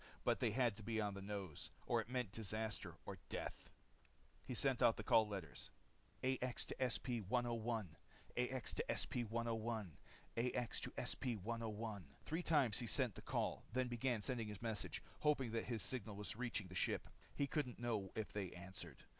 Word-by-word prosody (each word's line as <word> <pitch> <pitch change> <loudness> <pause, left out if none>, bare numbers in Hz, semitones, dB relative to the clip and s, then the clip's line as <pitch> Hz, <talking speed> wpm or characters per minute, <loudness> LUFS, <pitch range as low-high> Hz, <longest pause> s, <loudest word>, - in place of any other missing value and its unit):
They - - +4
had 120 -5 +3
to - - -7
be 110 +1 0
on 105 -1 +1
the 100 - -5
nose, 100 -6 -4 0.2
or - - +4
it - - -9
meant 125 -5 0
disaster 110 0 -2
or - - -5
death. - - -3 0.7
He 125 - -3
sent 130 +1 +3
out 120 -2 +7
the 110 - -3
call 110 +1 +6
letters. 95 -7 -5 0.5
"AX 130 -1 +1
to - - -4
SP 125 -1 +1
101... 115 -5 +1 0.4
AX 125 +1 0
to - - +1
SP 120 -3 +1
101... 115 -5 0 0.4
AX 120 0 +1
to - - -4
SP 125 -4 0
101 110 -3 -2
..." - - -27
Three 160 +3 0
times 140 -11 +4
he 120 - -1
sent 125 -2 +2
the - - -8
call, - - 0
then 130 0 +2
began 120 -2 +1
sending 115 -2 0
his 105 +1 -6
message, 110 -3 -1 0.2
hoping 135 -6 +3
that 115 0 0
his 115 -3 0
signal 115 -5 -2
was 105 +2 -2
reaching 115 -3 0
the - - -8
ship. 90 - +1 0.3
He 140 - +3
couldn't 140 -3 0
know 110 -5 0
if 110 -1 -2
they 100 -3 -1
answered. 90 -6 -6
115 Hz, 180 wpm, -43 LUFS, 105-125 Hz, 0.7 s, out